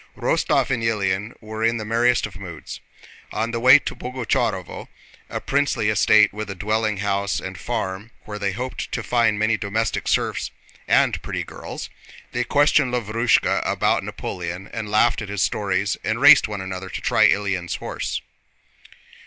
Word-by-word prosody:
Rostóv -, -, +1 dB
and 120 Hz, -3 st, 0 dB
Ilyín 105 Hz, -1 st, -1 dB
were 110 Hz, +1 st, -5 dB
in 115 Hz, +1 st, +2 dB
the 110 Hz, -, -5 dB
merriest 120 Hz, +2 st, +2 dB
of 105 Hz, -, -9 dB
moods. 85 Hz, -5 st, -8 dB, 0.5 s
On 115 Hz, +2 st, -2 dB
the 115 Hz, -, -2 dB
way 130 Hz, +4 st, +8 dB
to 145 Hz, -, -5 dB
Boguchárovo, 115 Hz, -7 st, -2 dB, 0.4 s
a -, -, -3 dB
princely 140 Hz, -6 st, 0 dB
estate 105 Hz, 0 st, +4 dB
with 105 Hz, 0 st, -5 dB
a 95 Hz, -, -5 dB
dwelling 105 Hz, +2 st, -1 dB
house 100 Hz, 0 st, 0 dB
and 95 Hz, 0 st, -7 dB
farm 105 Hz, 0 st, -4 dB, 0.2 s
where 105 Hz, -1 st, -6 dB
they 100 Hz, -1 st, -1 dB
hoped 125 Hz, +6 st, -5 dB
to 115 Hz, -, -2 dB
find 115 Hz, -2 st, +2 dB
many 110 Hz, +1 st, +2 dB
domestic 110 Hz, +1 st, -2 dB
serfs -, -, 0 dB, 0.4 s
and -, -, +3 dB
pretty -, -, -4 dB
girls, -, -, -8 dB, 0.4 s
they -, -, -1 dB
questioned 145 Hz, -2 st, +3 dB
Lavrúshka 115 Hz, 0 st, +1 dB
about -, -, +1 dB
Napoleon 90 Hz, +2 st, -5 dB
and 110 Hz, -2 st, -4 dB
laughed 115 Hz, +3 st, +3 dB
at 105 Hz, -, -6 dB
his 100 Hz, -2 st, 0 dB
stories, 100 Hz, -1 st, 0 dB
and -, -, -1 dB
raced -, -, +8 dB
one 105 Hz, -2 st, -5 dB
another 95 Hz, 0 st, -6 dB
to -, -, -5 dB
try -, -, +4 dB
Ilyín's 95 Hz, -3 st, -1 dB
horse. -, -, -4 dB
105 Hz, 160 wpm, -22 LUFS, 100-115 Hz, 0.5 s, way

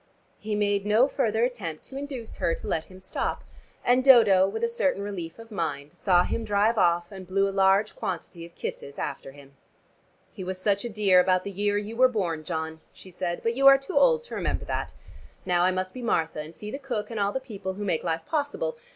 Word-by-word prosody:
He 210 Hz, 0 st, -3 dB
made 205 Hz, -1 st, +1 dB
no 215 Hz, +5 st, +4 dB
further 225 Hz, -5 st, 0 dB
attempt 195 Hz, -11 st, -5 dB
to 265 Hz, -, -11 dB
induce 270 Hz, -5 st, -6 dB
her 165 Hz, -, +1 dB
to -, -, -9 dB
let 160 Hz, -, -1 dB
him 185 Hz, 0 st, -14 dB
stop, 190 Hz, -, -3 dB, 0.4 s
and 250 Hz, +1 st, +4 dB
Dodo, 215 Hz, -8 st, +7 dB
with 200 Hz, -, -4 dB
a -, -, +4 dB
certain 285 Hz, -, 0 dB
relief 175 Hz, -5 st, -6 dB
of 230 Hz, 0 st, -13 dB
mind, 150 Hz, -6 st, -4 dB
saw 180 Hz, -3 st, +3 dB
him 230 Hz, -, -2 dB
drive 210 Hz, +2 st, +2 dB
off 175 Hz, 0 st, +2 dB
and 190 Hz, -2 st, -9 dB
blew 195 Hz, +2 st, +2 dB
a -, -, -2 dB
large 195 Hz, +2 st, +3 dB
quantity 170 Hz, -1 st, -5 dB
of 170 Hz, 0 st, -12 dB
kisses 140 Hz, -, -6 dB
after 135 Hz, -, -5 dB
him. 140 Hz, 0 st, -16 dB, 0.8 s
"He 190 Hz, -, -7 dB
was 185 Hz, 0 st, -4 dB
such 200 Hz, +1 st, +1 dB
a 240 Hz, -, -3 dB
dear 200 Hz, -4 st, +4 dB
about 185 Hz, 0 st, +3 dB
the 200 Hz, -, -5 dB
year 205 Hz, +1 st, 0 dB
you 210 Hz, +2 st, -4 dB
were 255 Hz, +2 st, +6 dB
born, 180 Hz, -10 st, -2 dB
John," 160 Hz, -1 st, -4 dB
she 185 Hz, -, -14 dB
said, 175 Hz, -1 st, -4 dB
"but 230 Hz, -, +1 dB
you 275 Hz, +3 st, +4 dB
are 275 Hz, 0 st, +9 dB
too 275 Hz, +8 st, -7 dB
old 485 Hz, -1 st, +4 dB
to 480 Hz, -, -10 dB
remember -, -, -2 dB
that. -, -, -3 dB, 0.5 s
Now 175 Hz, -1 st, +2 dB
I -, -, +4 dB
must 185 Hz, 0 st, -3 dB
be 255 Hz, -, -7 dB
Martha, 165 Hz, -10 st, 0 dB
and 155 Hz, +2 st, -7 dB
see 210 Hz, 0 st, -7 dB
the 275 Hz, -, -5 dB
cook 235 Hz, -6 st, -4 dB
and 225 Hz, -, -3 dB
all 200 Hz, 0 st, +1 dB
the 265 Hz, -, -2 dB
people 205 Hz, -7 st, -6 dB
who 205 Hz, +2 st, -6 dB
make 170 Hz, -5 st, 0 dB
life 165 Hz, 0 st, -2 dB
possible. 325 Hz, +12 st, -2 dB
200 Hz, 230 wpm, -26 LUFS, 175-235 Hz, 0.8 s, are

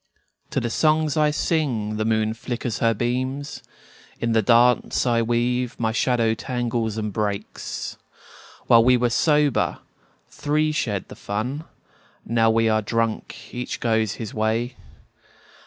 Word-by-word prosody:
To -, -, 0 dB
the 120 Hz, -, -3 dB
songs 155 Hz, 0 st, +2 dB
I 150 Hz, -1 st, +3 dB
sing 130 Hz, -9 st, -1 dB
the 110 Hz, -, -1 dB
moon 110 Hz, -1 st, +1 dB
flickers 120 Hz, -1 st, -4 dB
her 115 Hz, -1 st, +2 dB
beams; 130 Hz, +5 st, -2 dB, 0.6 s
In 115 Hz, -, 0 dB
the 110 Hz, 0 st, +3 dB
dance 120 Hz, +5 st, +3 dB
I 120 Hz, -2 st, +2 dB
weave 120 Hz, +1 st, 0 dB
my 110 Hz, -1 st, +1 dB
shadow 115 Hz, -1 st, +2 dB
tangles 115 Hz, -2 st, -2 dB
and 105 Hz, -2 st, -3 dB
breaks. 105 Hz, -1 st, -4 dB, 0.7 s
While 115 Hz, -1 st, +6 dB
we 125 Hz, +1 st, +5 dB
were 120 Hz, 0 st, +1 dB
sober, 150 Hz, 0 st, +2 dB, 0.5 s
three 155 Hz, +1 st, 0 dB
shared 105 Hz, -10 st, -2 dB
the -, -, -9 dB
fun; 125 Hz, +10 st, -4 dB, 0.6 s
Now 115 Hz, 0 st, +3 dB
we 115 Hz, 0 st, +3 dB
are 110 Hz, 0 st, +2 dB
drunk, 115 Hz, 0 st, -3 dB
each 125 Hz, 0 st, -4 dB
goes 110 Hz, -3 st, +1 dB
his 110 Hz, -3 st, -7 dB
way. 115 Hz, +3 st, -1 dB
115 Hz, 140 wpm, -23 LUFS, 110-125 Hz, 0.7 s, While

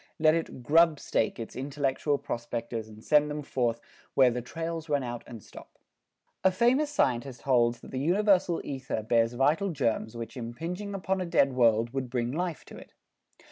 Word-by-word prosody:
Let 155 Hz, 0 st, +5 dB
it 160 Hz, -6 st, -3 dB
"grubstake" 155 Hz, -5 st, +3 dB
its 115 Hz, -, -7 dB
intellectual 140 Hz, +1 st, -1 dB
prospectors 115 Hz, -2 st, -4 dB
and 110 Hz, 0 st, -13 dB
send 150 Hz, -1 st, +4 dB
them 150 Hz, 0 st, -4 dB
forth 120 Hz, -4 st, -1 dB, 0.4 s
where 130 Hz, -2 st, +6 dB
"the 125 Hz, +1 st, -3 dB
trails 165 Hz, +4 st, -5 dB
run 145 Hz, -2 st, +1 dB
out 120 Hz, -1 st, -5 dB
and 115 Hz, -5 st, -10 dB
stop." -, -, -14 dB, 0.7 s
A 190 Hz, -, +6 dB
famous 245 Hz, +10 st, +2 dB
scientist 130 Hz, -, 0 dB
holds 120 Hz, -3 st, +2 dB
that -, -, -12 dB
the 130 Hz, -, -3 dB
universal 185 Hz, +2 st, +2 dB
ether 130 Hz, -5 st, -4 dB
bears 115 Hz, +1 st, +2 dB
vital 150 Hz, +10 st, +2 dB
germs 115 Hz, -6 st, -1 dB
which 115 Hz, +1 st, -7 dB
impinging 170 Hz, -, -5 dB
upon 190 Hz, 0 st, -1 dB
a -, -, -1 dB
dead 140 Hz, -5 st, +3 dB
world 115 Hz, -2 st, +3 dB
would 135 Hz, -2 st, -3 dB
bring 120 Hz, -1 st, -1 dB
life 170 Hz, +2 st, -3 dB
to -, -, -11 dB
it. -, -, -15 dB
135 Hz, 175 wpm, -28 LUFS, 120-165 Hz, 0.7 s, where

